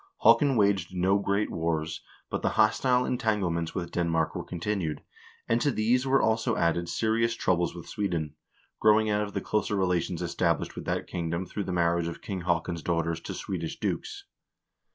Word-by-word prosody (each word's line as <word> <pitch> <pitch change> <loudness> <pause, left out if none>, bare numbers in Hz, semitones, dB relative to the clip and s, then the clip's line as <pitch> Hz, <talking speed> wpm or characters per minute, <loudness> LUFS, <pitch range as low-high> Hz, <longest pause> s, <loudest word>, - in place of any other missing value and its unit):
1 - - +9
Haakon 140 -3 +1
waged 100 -4 +2
no 95 +2 +3
great 100 +1 0
wars, 80 -1 -2 0.3
but - - -2
the - - +1
hostile 125 +4 +3
entanglements 95 -9 -1
with 85 -2 -3
Denmark 80 -2 0
were - - -4
continued, 85 -3 -3 0.4
and 115 +1 +2
to 145 - +3
these 125 +2 +1
were 135 +1 +4
also 110 +1 +1
added 85 +1 +1
serious 115 +3 +1
trou 95 - +2
bles 85 0 -1
with 85 - -9
Sweden, 85 -7 -2 0.5
growing 110 0 +4
out 105 0 +2
of 105 -1 -4
the - - 0
closer 105 -1 0
relations 90 -2 0
established 85 -1 0
with - - -7
that - - -1
kingdom 85 +1 -3
through 100 +3 -4
the - - -3
marriage 85 -1 +1
of 85 - -6
King 95 -3 -4
Haakon's 85 -1 -1
daughters 85 +1 -1
to - - -6
Swedish 85 -4 -4
dukes. 415 -2 -3
90 Hz, 180 wpm, -28 LUFS, 85-105 Hz, 0.5 s, 1